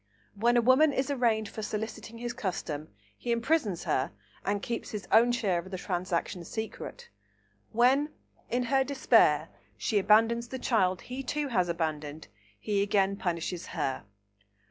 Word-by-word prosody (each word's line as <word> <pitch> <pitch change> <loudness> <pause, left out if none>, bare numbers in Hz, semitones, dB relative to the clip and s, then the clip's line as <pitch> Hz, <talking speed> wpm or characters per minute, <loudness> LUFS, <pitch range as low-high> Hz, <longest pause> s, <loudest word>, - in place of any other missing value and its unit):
When 235 +4 +2
a 240 - +4
woman 265 +5 +6
is 270 +2 0
arraigned 230 -5 +1
for 220 - -7
soliciting 220 +2 -5
his 240 +1 -4
custom, 180 - -4 0.3
he 240 - -4
imprisons 235 - +1
her, 130 - 0 0.3
and 205 +1 0
keeps 235 -1 -3
his 210 -2 -6
own 235 +2 +6
share 205 -7 +1
of 180 +2 -8
the 190 - -4
transaction 180 -1 -2
secret. 220 - -6 0.6
When, 260 +6 +4 0.4
in 250 +1 +1
her 270 +2 +2
despair, 275 -1 +3 0.3
she 210 - +1
abandons 225 +4 +4
the 260 - -5
child 190 -8 +1
he 255 +2 -6
too 290 +2 -2
has 185 -7 +1
abandoned, 155 -2 -3 0.3
he 205 -2 0
again 200 -1 +2
punishes 175 -2 -3
her. 130 -6 -1
220 Hz, 150 wpm, -29 LUFS, 185-245 Hz, 0.6 s, woman